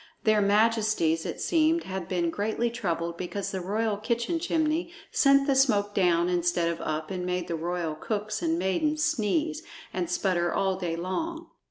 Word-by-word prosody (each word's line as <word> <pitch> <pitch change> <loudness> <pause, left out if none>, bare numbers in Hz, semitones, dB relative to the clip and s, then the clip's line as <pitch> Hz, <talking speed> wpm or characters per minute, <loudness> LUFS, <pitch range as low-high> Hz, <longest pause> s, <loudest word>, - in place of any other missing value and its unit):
Their 215 -1 +4
majesties, 210 -5 +2
it - - -5
seemed, 325 0 +2
had 190 -2 -5
been 175 -2 0
greatly 220 +5 -1
troubled 170 -7 -2
because 190 +3 -4
the 190 - -3
royal 210 +3 -1
kitchen 235 +9 -1
chimney 325 0 0 0.2
sent 275 -1 +4
the 275 - +3
smoke 210 -7 +3
down 175 -3 +3
instead 175 -1 +1
of 170 - -4
up 155 +2 -3
and 185 -1 -3
made 180 -1 -2
the 170 - -2
royal 170 0 -2
cooks 210 +6 -3
and 165 -1 +1
maidens 300 - 0
sneeze 310 +3 0 0.3
and 350 - -2
sputter 185 - +1
all 190 -1 +1
day 175 -3 -3
long. 320 - -4
200 Hz, 170 wpm, -27 LUFS, 175-270 Hz, 0.3 s, Their